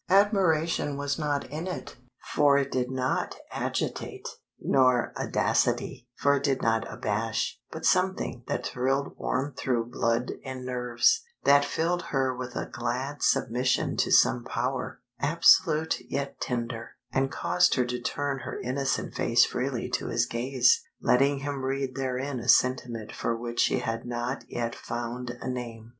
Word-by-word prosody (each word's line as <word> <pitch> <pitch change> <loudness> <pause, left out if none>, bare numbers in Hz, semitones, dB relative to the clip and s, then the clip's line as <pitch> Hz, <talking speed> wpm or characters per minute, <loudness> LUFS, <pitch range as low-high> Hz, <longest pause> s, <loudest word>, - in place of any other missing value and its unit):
Admiration 175 -7 +3
was 145 +2 -2
not 145 -2 -1
in 160 +4 -4
it, 185 - -6 0.4
for 145 -1 +5
it 140 -1 0
did 125 -1 0
not 130 0 -1 0.2
agitate; - - -3 0.3
nor 130 -2 +3
audacity, 120 - 0
for 140 0 +3
it 140 - -4
did 135 -2 +1
not 115 0 0
abash; 110 +1 -2
but - - -6
something 185 -9 +1
that - - -2
thrilled 135 +2 -1
warm 135 +2 -1
through 120 -2 -1
blood 115 +1 0
and 130 -1 -6
nerves, 125 - +2 0.2
that 140 0 +6
filled 170 +4 0
her 130 -2 0
with 125 0 -6
a - - -2
glad 130 +5 -3
submission 125 +3 +1
to - - +1
some 120 - +5
power, 125 +1 -3 0.2
absolute 160 -1 +4
yet 140 0 -3
tender, 120 -1 -3 0.2
and 135 +1 +1
caused 180 0 +2
her 125 - +2
to 125 0 -3
turn 140 +3 -2
her - - -6
innocent 130 +1 -1
face - - +4
freely - - -2
to - - -2
his 120 - +1
gaze, 120 +1 +2 0.2
letting 140 +3 +3
him 140 -1 -3
read 135 0 -1
therein 130 0 -2
a 120 +2 -5
sentiment 120 -4 +2
for 115 - -2
which 120 0 -5
she - - +3
had 115 0 -3
not 120 +2 -3
yet 115 -1 -2
found 120 +1 -5
a - - -6
name. 120 -3 -5
130 Hz, 150 wpm, -27 LUFS, 120-140 Hz, 0.4 s, that